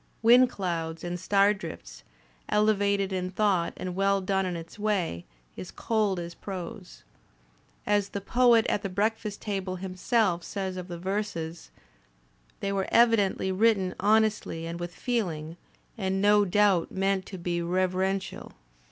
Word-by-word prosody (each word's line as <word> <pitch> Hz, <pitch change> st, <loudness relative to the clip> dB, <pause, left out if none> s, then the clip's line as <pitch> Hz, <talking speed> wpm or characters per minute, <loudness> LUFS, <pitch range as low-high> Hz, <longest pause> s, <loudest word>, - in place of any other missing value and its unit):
"Wind 245 Hz, +2 st, +7 dB
Clouds 165 Hz, -6 st, -4 dB
and 175 Hz, 0 st, -4 dB
Star 200 Hz, +2 st, +3 dB
Drifts," -, -, -9 dB, 0.5 s
elevated 200 Hz, -2 st, +2 dB
in 185 Hz, -1 st, -2 dB
thought 190 Hz, -3 st, +1 dB
and 180 Hz, -1 st, -4 dB
well 195 Hz, +1 st, +2 dB
done 190 Hz, 0 st, 0 dB
in 180 Hz, -, -3 dB
its 165 Hz, +5 st, -9 dB
way, 190 Hz, -, -1 dB, 0.3 s
is 95 Hz, -, -8 dB
cold 210 Hz, -5 st, 0 dB
as 170 Hz, 0 st, -6 dB
prose. 185 Hz, 0 st, -8 dB, 0.8 s
As 205 Hz, -1 st, +1 dB
the 200 Hz, -, -4 dB
Poet 235 Hz, +2 st, +4 dB
at 205 Hz, -, 0 dB
the 195 Hz, -, -3 dB
Breakfast 210 Hz, +2 st, -2 dB
Table 195 Hz, -3 st, -3 dB
himself 185 Hz, 0 st, 0 dB
says 190 Hz, -2 st, -4 dB
of 180 Hz, -1 st, -6 dB
the 175 Hz, -2 st, -6 dB
verses: 175 Hz, -3 st, -4 dB, 0.9 s
"They 200 Hz, -, -1 dB
were 195 Hz, -1 st, -1 dB
evidently 220 Hz, -5 st, +3 dB
written 195 Hz, -2 st, +2 dB
honestly, 210 Hz, -5 st, +1 dB
and 170 Hz, +1 st, -5 dB
with 175 Hz, 0 st, -6 dB
feeling, 170 Hz, -10 st, -2 dB, 0.4 s
and 190 Hz, -1 st, -1 dB
no 205 Hz, +1 st, +4 dB
doubt 195 Hz, -2 st, +2 dB
meant 195 Hz, 0 st, 0 dB
to 190 Hz, -, -7 dB
be 175 Hz, 0 st, -2 dB
reverential." 185 Hz, +2 st, -1 dB
190 Hz, 145 wpm, -27 LUFS, 175-205 Hz, 0.9 s, Wind